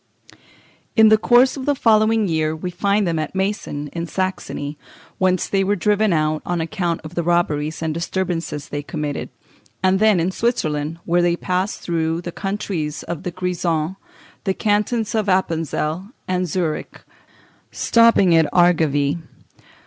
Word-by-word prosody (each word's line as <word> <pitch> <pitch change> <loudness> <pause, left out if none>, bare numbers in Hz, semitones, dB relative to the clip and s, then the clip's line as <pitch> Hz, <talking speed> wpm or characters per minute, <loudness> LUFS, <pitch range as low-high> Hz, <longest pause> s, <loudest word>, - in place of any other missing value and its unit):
] - - -28 0.3
In 220 -2 +7
the 220 - +6
course 245 +3 +4
of 270 -1 -6
the 290 - +3
following 220 -2 +3
year 160 -2 0
we 180 +3 -5
find 200 +3 +1
them 165 -2 0
at 155 - -4
Meissen, 190 -7 -2
in 170 +2 -5
Saxony, 185 -6 -3 0.4
whence 185 -1 +2
they 195 -1 +1
were 200 +2 +1
driven 210 +2 +2
out 155 -1 +1
on 175 -1 -2
account 170 0 -2
of 155 +2 -9
the 175 - -1
robberies 165 -2 0
and 160 -1 -1
disturbances 170 -3 -3
they 145 - -3
committed; 150 -2 -4 0.5
and 190 0 +3
then 215 -3 +4
in 170 +3 0
Switzerland, 160 -9 -1
where 175 +1 +2
they 175 0 +2
passed 185 +3 -2
through 165 -1 -1
the 175 - -6
countries 195 -6 -3
of 170 -2 -5
the - - -3
Grisons, 175 -2 -1 0.5
the 190 -2 0
cantons 210 +2 0
of 215 -2 0
Appenzell, 165 -1 0 0.2
and 185 0 0
Zurich, 165 -1 -3 0.7
stopping 230 -6 +4
in 160 -2 +4
Argovie. 160 -4 +3
175 Hz, 155 wpm, -21 LUFS, 160-200 Hz, 0.7 s, In